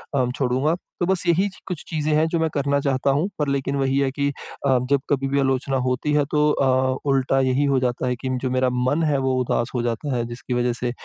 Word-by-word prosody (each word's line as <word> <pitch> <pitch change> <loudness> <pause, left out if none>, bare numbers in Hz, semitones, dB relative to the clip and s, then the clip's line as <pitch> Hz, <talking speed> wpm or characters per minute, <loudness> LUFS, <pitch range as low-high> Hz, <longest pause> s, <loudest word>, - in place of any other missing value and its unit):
अम 125 -2 +1
छोड़ूँगा। 135 +4 +1 0.2
तो 175 - +1
बस 190 -1 +1
यही 175 +4 +3 0.2
कुछ 180 -4 -5
चीज़ें 155 -1 -1
हैं 155 +1 +3
जो 165 +1 -1
मैं 160 0 +1
करना 140 0 +1
चाहता 140 -1 0
हूँ, 150 +7 +1
पर 150 - 0
लेकिन 140 0 -1
वही 135 -1 +1
है 135 - +2
कि 140 +1 -1 0.4
अ, 130 - +4
जब 140 -1 +3
कभी 135 -1 +1
भी 140 +1 +1
आलोचना 135 0 0
होती 130 +4 0
है, 150 -1 +3
तो 150 0 +3
अ, 130 -2 +2
उल्टा 135 0 +2
यही 130 +2 +2
हो 140 -2 +2
जाता 125 0 -1
है 125 - 0
कि 130 +2 -5
जो 130 - -1
मेरा 130 0 +2
मन 125 +6 +1
है 150 -3 +2
वो 130 -1 0
उदास 120 -1 0
हो 120 - +1
जाता 120 +4 -2
है, 120 -1 -1
जिसकी 120 +1 -6
वजह 120 0 +1
से 120 0 -3
135 Hz, 245 wpm, -23 LUFS, 130-145 Hz, 0.4 s, अ